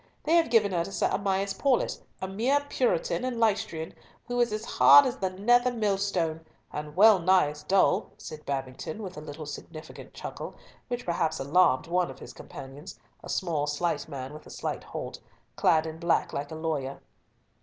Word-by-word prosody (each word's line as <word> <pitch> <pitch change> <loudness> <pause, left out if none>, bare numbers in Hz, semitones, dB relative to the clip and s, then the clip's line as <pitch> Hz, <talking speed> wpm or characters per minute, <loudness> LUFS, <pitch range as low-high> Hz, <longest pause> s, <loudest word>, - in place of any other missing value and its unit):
They 320 +3 +3
have 335 -5 +4
given 220 -4 +4
her 170 -2 +1
Sir 195 +3 -1
Amias 195 0 0
Paulett, 260 +5 +1 0.2
a - - -1
mere 235 +9 +1
Puritan - - 0
and 255 -2 -2
Leicestrian, 210 -7 0 0.3
who 245 0 -2
is 240 -2 +2
as 215 +1 -3
hard 285 - +7
as 260 0 -2
the 190 - -1
nether 240 +7 +3
millstone, 195 -7 0 0.3
and 150 0 -6
well 210 0 +7
nigh 180 -3 +4
as 150 0 -11
dull," 195 +1 +2
said 155 -1 -9
Babington, 135 +8 -4
with 185 -2 -7
a 150 - -7
little 155 +1 -8
significant 155 +2 -9
chuckle, - - -7 0.3
which 245 0 -4
perhaps 165 -2 0
alarmed 150 +1 +3
one 175 -1 +1
of 135 - -9
his - - -10
companions, 140 +7 -10 0.2
a - - -9
small 160 -6 -1
slight 160 +4 -1
man 135 -1 -6
with 155 - -11
a - - -12
slight - - -4
halt, - - -6 0.4
clad 160 0 +3
in 160 0 -6
black 170 0 +1
like 145 +1 -3
a 160 - -7
lawyer. 150 -4 -3
180 Hz, 180 wpm, -28 LUFS, 155-220 Hz, 0.4 s, hard